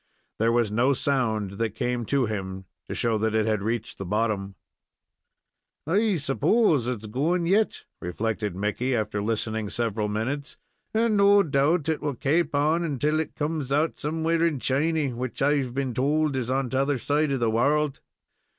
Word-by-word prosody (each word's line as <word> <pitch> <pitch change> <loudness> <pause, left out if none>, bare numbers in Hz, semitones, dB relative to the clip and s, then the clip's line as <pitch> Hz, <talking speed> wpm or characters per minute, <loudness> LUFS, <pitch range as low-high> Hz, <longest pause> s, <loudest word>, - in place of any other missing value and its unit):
There 115 +1 +3
was 115 -3 +1
no 125 +6 +3
sound 110 -8 -1
that 115 -2 -1
came 120 -2 -2
to 140 -3 +2
him 95 -3 -5 0.2
to - - -3
show 115 -2 +1
that 110 0 0
it 110 -1 +2
had 110 -2 0
reached 115 +2 -3
the - - -3
bottom. 100 0 -1 1.3
"I 200 +6 +2
s'pose 150 - +2
it's 120 -4 -3
going 155 +11 0
yet," 205 +5 +1 0.2
reflected 105 +2 -3
Mickey, 105 +6 -1
after 105 -2 -1
listening 110 0 -2
several 110 -2 -1
minutes, 125 +8 -3 0.3
"and 225 0 +2
no 200 0 +6
doubt 145 +2 +1
it 160 -1 0
will 145 -3 -2
kaap 150 +5 +1
on 155 +1 +1
till 150 +4 +1
it 160 - -4
comes 150 -3 -2
out 150 +3 +1
somewhere 160 +2 0
in 160 -5 +1
Chiny, 145 +1 0
which 125 +1 -5
I've 135 -3 +1
been 135 -2 -1
told 145 +3 +1
is 125 -2 -2
on 130 -1 0
t'other 135 +1 +1
side 145 +4 0
of 135 - -1
the 115 -2 +1
world. 140 +5 +1
130 Hz, 170 wpm, -26 LUFS, 110-150 Hz, 1.3 s, no